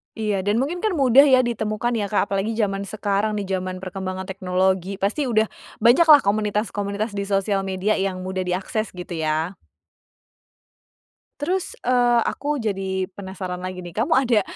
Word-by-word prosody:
Iya, 210 -3 -1
dan 205 +1 +2
mungkin 320 +7 -2
kan 420 -1 0
mudah 275 -1 +6
ya 260 -2 +5
ditemukan 225 0 -1
ya, 205 - -1
Kak, 205 0 0
apalagi 200 +3 -1
zaman 200 -3 -1
sekarang, 205 +1 -1
di 205 - -2
zaman 185 -1 -4
perkembangan 185 0 -4
teknologi. 190 0 0
Pasti 205 +9 -1
udah 220 -2 +2 0.3
banyaklah 295 +5 +7
komunitas-komunitas 210 0 -1
di 200 -1 -4
sosial 195 0 0
media 190 +3 0
yang 190 -1 -2
mudah 185 0 -3
diakses 190 +4 -2
gitu 180 0 -7
ya? 160 +4 -1 1.8
Terus, 365 +5 -2
eee, 245 -1 +3
aku 295 +1 -2
jadi 195 -5 -2
penasaran 190 -2 -6
lagi 185 -1 -6
nih, 175 - -9
kamu 225 +5 -1
ada 245 -5 +3
200 Hz, 155 wpm, -23 LUFS, 190-230 Hz, 1.8 s, banyaklah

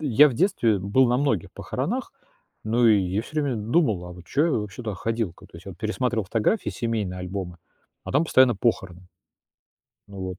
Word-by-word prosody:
я 145 +1 +5
в 130 - -5
детстве, 125 - +2
э, - - -3
был 100 +8 +3
на 120 - +2
многих 130 - 0
похоронах. - - -4 0.5
Ну 120 +2 +3
и 110 -2 +6
я 95 +3 -1
всё 155 +5 -3
время 135 -5 -1
д 105 +2 -6
думал, 110 - +2
а 90 - -8
вот 90 0 -13
чё 150 +4 +1
я 170 - 0
вообще 105 0 -3
туда 110 -3 -4
ходил? 115 -2 -2
К - - -16
то - - -15
есть 85 - -14
я 95 - -7
пересматривал 110 +1 -1
фотографии, 115 - 0
семейные 110 -6 -3
альбомы, 90 -1 -5 0.5
а - - -6
там 145 +4 +3
постоянно 130 -6 +4
похороны. 90 -6 -2 1.0
Ну 100 -1 -9
вот. 95 -1 -5
110 Hz, 210 wpm, -24 LUFS, 95-125 Hz, 1.0 s, и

